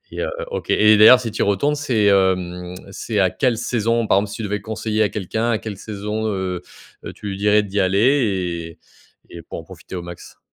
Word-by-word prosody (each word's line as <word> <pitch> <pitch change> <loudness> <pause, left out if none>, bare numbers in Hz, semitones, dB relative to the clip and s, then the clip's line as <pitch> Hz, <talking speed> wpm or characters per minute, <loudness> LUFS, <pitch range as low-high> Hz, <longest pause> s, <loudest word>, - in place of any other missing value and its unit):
et - - -5
heu, - - -2 0.2
OK, 485 - -5
et 105 0 +5
d'ailleurs, 110 +4 +9
si 115 -4 -5
tu - - -6
y - - +4
retournes, 120 +10 +1
c'est, 125 -8 0
hem, 90 -2 +1 0.2
c'est 110 0 -3
à 95 -1 +3
quelle 125 -5 0
saison? 115 -1 0
Par 95 - +4
exemple, 100 0 -2
si - - -6
tu 115 - -6
devais 105 0 -2
conseiller 110 0 -2
à 105 - +3
quelqu'un 110 +4 -2
à 110 - +1
quelle 105 -3 -7
saison, 105 +1 -4
heu, 95 -3 -3 0.4
heu, - - -6
tu - - -10
lui 95 - -4
dirais 105 +1 +3
d'y 100 0 -2
aller 95 - +1 0.5
et - - -31
et 85 - -9
pour - - -8
en - - -9
profiter 95 - -10
au 90 - -5
max? 85 -1 -11
105 Hz, 230 wpm, -20 LUFS, 95-110 Hz, 0.5 s, d'ailleurs